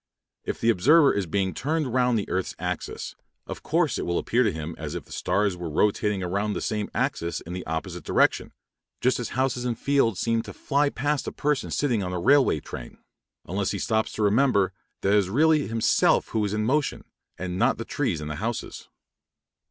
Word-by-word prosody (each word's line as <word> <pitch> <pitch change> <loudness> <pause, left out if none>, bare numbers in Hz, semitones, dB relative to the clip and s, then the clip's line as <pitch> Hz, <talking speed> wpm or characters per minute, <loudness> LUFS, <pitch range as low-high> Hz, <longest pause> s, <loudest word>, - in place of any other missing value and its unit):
If - - -3
the 115 - +4
observer 145 - +5
is 100 -3 -1
being 95 +2 0
turned 150 -3 -1
round 125 -2 +3
the 105 - -2
earth's 95 0 -2
axis, - - -4 0.3
of - - -7
course 165 -2 +1
it - - -3
will 85 - 0
appear 120 - +1
to 110 -5 +3
him 80 0 -5
as 75 -2 -5
if - - -5
the - - -19
stars 100 -2 0
were 90 -2 -5
rotating 100 +4 +1
around 100 +4 -1
the - - -2
same 105 -1 -2
axis 85 0 -1
in 85 - -8
the 90 - -5
opposite 80 +1 -4
direction, - - +2 0.5
just 125 +1 +2
as 120 - -3
houses 130 -2 0
and 120 -2 -2
fields 135 -8 +1
seem 115 -1 +1
to 105 -2 -9
fly 145 0 +1
past 145 0 -1
a - - -2
person 150 -2 -1
sitting 125 -7 0
in 90 -1 -3
a 90 - -2
railway 135 - +4
train, 60 -3 -9 0.5
unless 95 +3 -1
he 100 - -2
stops 110 +3 0
to 110 - -2
remember 105 -3 +3 0.3
that 100 - +2
it 105 - +6
is 95 -2 -1
really 150 +6 +3
himself 115 0 +2
who 110 - 0
is 105 0 -1
in 105 0 0
motion, 145 +5 0 0.3
and 90 +1 -4
not - - +3
the - - -5
trees - - -1
and 75 0 -5
houses. 115 +8 -5
110 Hz, 205 wpm, -25 LUFS, 95-130 Hz, 0.5 s, it